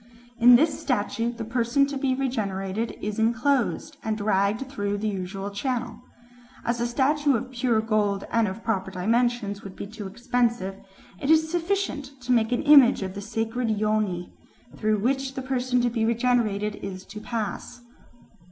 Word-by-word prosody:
In 245 +1 +9
this 305 +5 +3
statue 235 -1 -1
the 235 -1 -6
person 240 +4 +2
to 280 0 -5
be 265 -1 0
regenerated 215 -5 -2
is 210 +1 -3
enclosed, 245 +5 +1
and 220 -1 -1
dragged 205 +3 +1
through 205 -7 -2
the 215 +2 -2
usual 195 0 -4
channel. 245 +4 -3 0.6
As 235 0 0
a 240 - +1
statue 280 +3 +2
of 250 +3 -3
pure 240 -3 +1
gold 210 -3 0
and 230 -2 +2
of 195 +4 -6
proper 195 -5 -1
dimensions 215 +2 0
would 195 -1 -9
be - - -6
too 205 -1 -7
expensive, 235 -2 -1 0.4
it 275 - -3
is 315 0 +4
sufficient 335 -6 -2
to 250 +1 -3
make 230 -1 +3
an 245 - 0
image 280 -7 +7
of 190 -1 -4
the 200 - -6
sacred 225 +3 -2
Yoni, 210 -4 -1 0.4
through 215 0 +1
which 265 +4 -1
the 265 - -3
person 255 -1 0
to 240 - +2
be 225 -1 -1
regenerated 225 -3 +1
is 190 -1 -7
to 210 - -9
pass." 235 +1 -4
230 Hz, 165 wpm, -25 LUFS, 205-255 Hz, 0.6 s, In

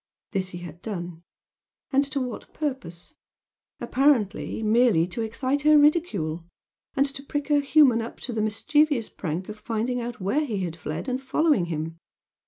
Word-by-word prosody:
This 190 -1 -1
he 175 - -7
had 175 -1 -9
done 175 -5 -5 0.7
and 275 +1 +5
to 275 0 -3
what 250 -3 -6
purpose? 260 - -5 0.7
Apparently 245 -6 +1
merely 220 -6 +4
to 185 +6 -5
excite 255 +5 -1
her 305 +1 +6
ridicule! 230 - +2 0.5
and 275 - +4
to 275 -1 -4
prick 290 +1 -4
her 295 -1 +5
humor 280 -5 +5
up 225 - -7
to 245 - -4
the 220 - -1
mischievous 275 +4 +2
prank 170 +3 -4
of 215 0 -8
finding 240 +2 -2
out 240 0 -5
where 205 +11 +1
he 215 -9 -2
had 170 -3 -3
fled 155 - -5
and 255 0 -1
following 270 - +2
him! 165 0 -4
230 Hz, 165 wpm, -25 LUFS, 180-280 Hz, 0.7 s, her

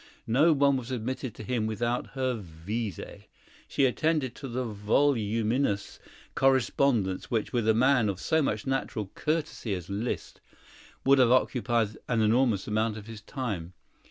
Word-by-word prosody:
No 140 +9 +4
one 140 -2 +3
was 125 -1 -6
admitted 130 0 -4
to - - -8
him 110 0 -1
without 120 +3 -1
her 130 -1 +1
visé; 100 +3 -6 0.4
she 140 - +2
attended 140 -1 +1
to 135 - -8
the 125 +1 -3
voluminous 110 0 0 0.3
correspondence 130 -6 +2
which, 115 0 -1
with 120 -3 0
a 110 - +4
man 125 -2 +4
of 95 -2 -3
so 160 - +1
much 110 -7 -1
natural 120 -6 -2
courtesy 150 -9 -2
as 90 +1 -7
Liszt, 110 +5 -4 0.6
would 135 0 +6
have 125 -2 +5
occupied 120 -3 +1
an 120 -2 +1
enormous 110 -1 +2
amount 110 +1 0
of 105 - -9
his 110 -1 -9
time. 105 - -4
115 Hz, 150 wpm, -28 LUFS, 105-130 Hz, 0.6 s, would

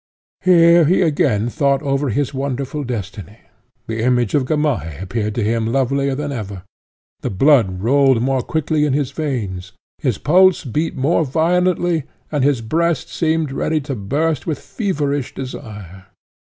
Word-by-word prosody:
Here 170 -2 +6
he 185 +4 +3
again 130 -9 +1
thought 140 0 +1
over 140 0 0
his 140 +4 -1
wonderful 140 +2 -3
destiny; 105 -3 -6 0.5
the 110 0 -3
image 120 -2 +1
of 140 -3 +2
Gamaheh 130 - -1
appeared 105 +3 -3
to 120 - 0
him 110 +1 0
lovelier 135 +1 0
than 145 +1 -3
ever; 100 -7 -6 0.6
the - - -3
blood 100 -5 +3
rolled 135 0 +4
more 130 +2 0
quickly 155 +2 -1
in 145 -3 +1
his 140 -2 -1
veins, 105 - -4 0.3
his 125 -8 -1
pulse 185 +4 +4
beat 150 +6 -2
more 150 +5 +1
violently, 170 +1 +1 0.3
and 145 -3 0
his 140 -4 +2
breast 165 +5 0
seemed 160 -3 0
ready 155 +3 0
to 140 0 -5
burst 140 +7 -1
with 155 -4 -1
feverish 145 - -3
desire. 105 -8 -8
135 Hz, 150 wpm, -19 LUFS, 115-155 Hz, 0.6 s, Here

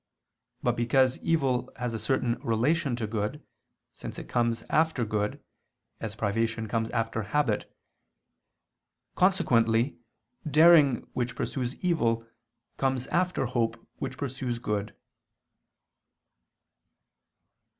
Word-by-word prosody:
But - - +2
because 130 +2 +2
evil 135 -7 0
has 125 -1 -3
a 115 - -3
certain 120 +1 0
relation 130 +5 +1
to 115 -2 -3
good, 110 +7 -3 0.5
since - - -8
it - - -7
comes 120 -1 0
after 155 -6 +2
good, 105 -1 -2 0.6
as 110 -1 -5
privation 110 +1 -1
comes 115 +1 -1
after 115 -1 -1
habit; 105 0 0 1.4
consequently 120 - +2 0.5
daring 150 -4 +6
which 125 -1 -2
pursues 125 -1 -2
evil, 115 -10 +1 0.5
comes 130 -1 0
after 180 -5 +1
hope 120 -2 0 0.2
which 130 - -4
pursues 130 -3 -3
good. 105 -3 -3
120 Hz, 100 wpm, -28 LUFS, 115-135 Hz, 1.4 s, daring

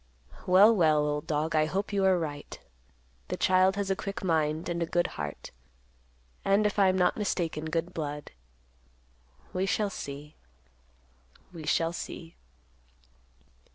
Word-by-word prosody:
"Well, 200 +5 +7
well, 155 -5 +3
old 150 0 -2
dog, 155 +1 -1
I 155 0 +3
hope 195 +5 -2
you 200 -1 +1
are 190 -1 +4
right. 145 -4 -5 0.7
The - - -3
child 185 +1 +4
has 200 -1 -1
a - - +2
quick 200 0 -5
mind, 160 -2 0
and 170 -1 -2
a 170 - 0
good 175 +1 +1
heart; 75 -1 -6 0.9
and, 200 +2 +3
if 210 0 0
I 195 - +6
am 185 0 +2
not 180 -1 +2
mistaken, 170 -7 -2
good 165 +2 -2
blood. 150 -2 -5 1.2
We 185 +1 0
shall 205 0 0
see. 145 0 -7 1.2
We 160 -3 -8
shall 165 +2 +1
see." 165 -1 -7
170 Hz, 145 wpm, -29 LUFS, 155-190 Hz, 1.2 s, Well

